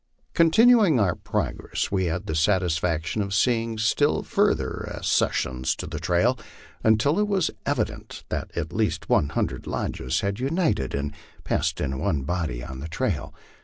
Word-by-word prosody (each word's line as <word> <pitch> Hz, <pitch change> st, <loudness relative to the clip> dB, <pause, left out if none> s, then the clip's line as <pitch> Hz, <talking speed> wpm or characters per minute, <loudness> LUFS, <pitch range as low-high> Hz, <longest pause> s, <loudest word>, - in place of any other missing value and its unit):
Continuing 200 Hz, -, +5 dB
our 95 Hz, -5 st, +3 dB
progress, -, -, -3 dB
we 95 Hz, -2 st, +1 dB
had 90 Hz, +3 st, -2 dB
the 80 Hz, -, -3 dB
satisfaction 80 Hz, +1 st, +1 dB
of 100 Hz, 0 st, -2 dB
seeing 115 Hz, 0 st, +1 dB
still 115 Hz, +7 st, +2 dB
further -, -, 0 dB
ac -, -, -7 dB, 0.2 s
cessions 65 Hz, 0 st, -2 dB
to -, -, -5 dB
the 75 Hz, -1 st, -5 dB
trail, 90 Hz, -, +2 dB, 0.4 s
until 110 Hz, -, +3 dB
it 210 Hz, -, +2 dB
was 195 Hz, -5 st, +1 dB, 0.2 s
evident 135 Hz, -7 st, -2 dB
that -, -, -3 dB
at 85 Hz, 0 st, -3 dB
least 110 Hz, -1 st, -1 dB
one 70 Hz, -, +3 dB
hundred 80 Hz, -, -2 dB
lodges 65 Hz, -, -2 dB
had 100 Hz, +2 st, -2 dB
united 140 Hz, -, 0 dB
and 70 Hz, +1 st, -3 dB, 0.3 s
passed -, -, -1 dB
in 65 Hz, -2 st, -2 dB
one 80 Hz, -9 st, 0 dB
body 80 Hz, -7 st, -2 dB
on 65 Hz, 0 st, -7 dB
the 75 Hz, -, -5 dB
trail. 85 Hz, -, -2 dB
100 Hz, 160 wpm, -25 LUFS, 80-125 Hz, 0.4 s, Continuing